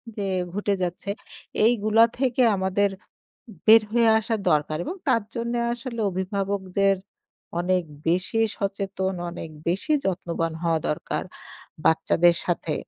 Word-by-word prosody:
যে, 205 - -3 0.3
ঘটে 205 0 0
যাচ্ছে। 180 +3 -4 0.6
এইগুলো 225 -1 +3 0.2
থেকে 255 -1 +1
আমাদের 190 +1 +1 0.8
বের 225 0 +9
হয়ে 235 0 +4
আসা 225 +1 -1
দরকার 150 +1 +1
এবং 370 - -4
তার 230 -5 +3
জন্যে 235 +1 -1
আসলে 235 -1 -6
অভিভাবকদের 195 +1 0 0.6
অনেক 180 0 +1 0.2
বেশি 185 +6 +1 0.2
সচেতন, 195 -2 -2 0.2
অনেক 170 -2 -7 0.2
বেশি 195 - 0
যত্নবান 170 -3 -1
হওয়া 165 -2 +1
দরকার 150 - -2 0.6
বাচ্চাদের 170 +1 +4
সাথে 170 -3 -1
195 Hz, 115 wpm, -25 LUFS, 175-225 Hz, 0.8 s, বের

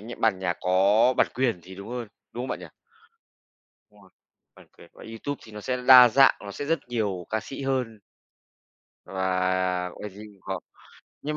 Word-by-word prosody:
nh 115 +3 -9
bản 110 -4 +2
nhạc 90 -2 -2
có 100 +7 +3
bản - - +4
quyền 120 -7 0
thì 95 +2 -12
đúng 100 +2 -10
hơn, 120 -2 -5 0.2
đúng 120 - -5
không 130 - -5
bạn - - -3
nhỉ? - - -9 1.2
Đúng 105 -1 -21
rồi, 95 - -20 0.4
bản - - -18
quyền - - -15
của - - -14
YouTube 115 +5 -5
thì 110 - -14
nó 105 - -8
sẽ 125 +4 -2
đa 125 -2 +10
dạng, 135 +4 +5
nó 100 - -7
sẽ 145 - -5
rất 165 +3 +1
nhiều 105 -7 -2
ca 110 - 0
sĩ 135 +6 -8
hơn 130 -5 -2 1.1
và 95 -1 -1
cái 105 - -5
gì 100 +3 -12
cũng 100 -2 -18
có. 95 -2 -4 0.6
Nhưng 150 +1 -3
105 Hz, 195 wpm, -26 LUFS, 95-125 Hz, 1.2 s, đa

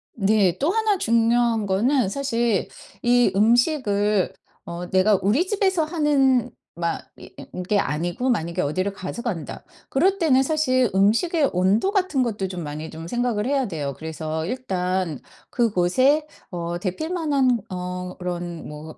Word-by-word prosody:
네. 195 -4 +2
또 290 - +1
하나 435 -1 +1
중요한 230 - +2
거는 225 +5 +2
사실 235 -4 0 0.3
이 245 -3 +4
음식을 210 - +2 0.3
어 175 +1 -6
내가 190 +2 +4
우리 240 - +2
집에서 380 -4 +1
하는 285 -6 +2 0.2
막 170 0 -3
이 - - -12
이 - - -9
이게 180 +3 -1
아니고 175 - -1
만약에 170 -4 -1
'어디를 185 +7 -1
가져간다.' 195 - -5 0.3
그럴 375 +8 +2
때는 290 -8 +3
사실 260 -5 +2
음식의 270 - +2
온도 190 - +2
같은 370 -10 +1
것도 210 -5 -2
좀 180 -2 -6
많이 150 +1 -6
좀 165 +1 -8
생각을 240 0 -1
해야 270 -1 +1
돼요. 150 -7 -4
그래서 160 0 -4
일단 185 - -2 0.3
그곳에 240 - +2 0.3
어 170 -1 -3
덥힐만한 275 - 0
어 180 0 -5
그런 175 -2 -5
뭐 150 +1 -9
210 Hz, 270 characters per minute, -23 LUFS, 180-265 Hz, 0.3 s, 이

